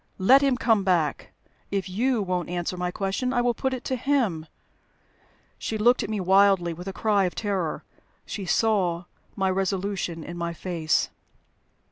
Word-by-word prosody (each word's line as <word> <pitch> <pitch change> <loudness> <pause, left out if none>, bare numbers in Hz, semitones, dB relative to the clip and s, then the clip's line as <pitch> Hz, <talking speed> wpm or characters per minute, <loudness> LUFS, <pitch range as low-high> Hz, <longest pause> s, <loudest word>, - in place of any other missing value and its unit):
"Let 255 +9 +6
him 275 -3 +2
come 225 -5 +2
back! 170 -6 0 0.4
If 195 -1 -2
you 225 +4 0
won't 180 -3 -2
answer 175 0 -2
my 180 0 -2
question, 195 +7 -2
I 245 -2 +2
will 240 0 +2
put 265 +2 -2
it 255 -1 -4
to 260 - -1
him." 240 - 0 1.1
She 220 - -3
looked 240 +4 +4
at - - -4
me 215 -1 -2
wildly, 190 -2 +4
with 175 +3 -9
a - - -2
cry 205 -1 +1
of 180 - -3
terror. 195 -7 -2 0.4
She 200 - -5
saw 185 -7 +1 0.3
my 190 -1 +1
resolution 190 -3 -2
in 175 +2 -7
my 170 0 -2
face. 165 -3 0
195 Hz, 165 wpm, -25 LUFS, 180-225 Hz, 1.1 s, Let